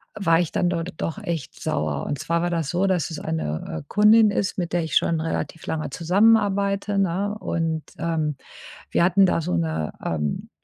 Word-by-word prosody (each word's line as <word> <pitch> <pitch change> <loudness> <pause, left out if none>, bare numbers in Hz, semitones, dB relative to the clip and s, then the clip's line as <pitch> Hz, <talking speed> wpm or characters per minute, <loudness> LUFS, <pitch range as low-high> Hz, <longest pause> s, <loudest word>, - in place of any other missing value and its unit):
war 165 -5 +3
ich 175 -2 -1
dann 175 - +1
dort 175 0 -3
doch 165 - -3
echt 170 -9 -5
sauer. 75 -2 -2
Und 145 - -3
zwar 170 0 0
war 175 - 0
das 165 -4 -1
so, 180 +3 +1
dass 185 -6 +1
es 160 - -6
eine, 80 0 -3
äh, - - -14
Kundin 215 +1 +6
ist, 200 -1 -1
mit 175 -2 -2
der 175 -1 +1
ich 160 - -4
schon 165 -1 +2
relativ 165 0 -4
lange 160 -1 -3
zusammenarbeite, 200 +3 +2
ne? 195 +2 0
Und, 165 -4 -1 0.2
ähm, 160 -2 -1 0.6
wir - - +3
hatten 190 +2 +5
da 180 - +1
so 150 - -2
'ne, 80 -2 -1
ähm, 75 -3 -2
170 Hz, 190 wpm, -23 LUFS, 155-195 Hz, 0.6 s, Kundin